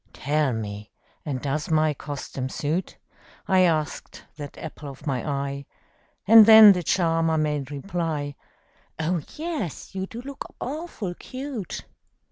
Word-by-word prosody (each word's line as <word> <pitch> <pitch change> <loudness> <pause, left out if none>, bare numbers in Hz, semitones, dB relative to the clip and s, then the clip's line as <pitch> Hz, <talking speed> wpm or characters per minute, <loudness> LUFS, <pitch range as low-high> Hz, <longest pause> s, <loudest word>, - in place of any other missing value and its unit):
"Tell 150 0 0
me 105 -2 -5 0.3
and 140 -4 -3
does 145 +3 -2
my 155 -1 +3
costume 140 -2 -5
suit?" 155 +7 -2 0.5
I 190 -1 +4
asked 160 -4 0
that 145 -2 -8
apple 155 -2 -8
of 135 +3 -12
my 130 -5 -1
eye 140 -1 -3 0.6
And 220 +1 +9
then 220 -2 +11
the 180 -2 +1
charmer 165 -1 +1
made 150 -3 -1
reply, 150 -1 -3 0.6
"Oh, 165 +1 0
yes, 305 - -4
you 190 0 -3
do 225 - -8
look 280 0 -8
awful 275 - -5
cute!" 255 - -6
155 Hz, 130 wpm, -25 LUFS, 145-190 Hz, 0.6 s, then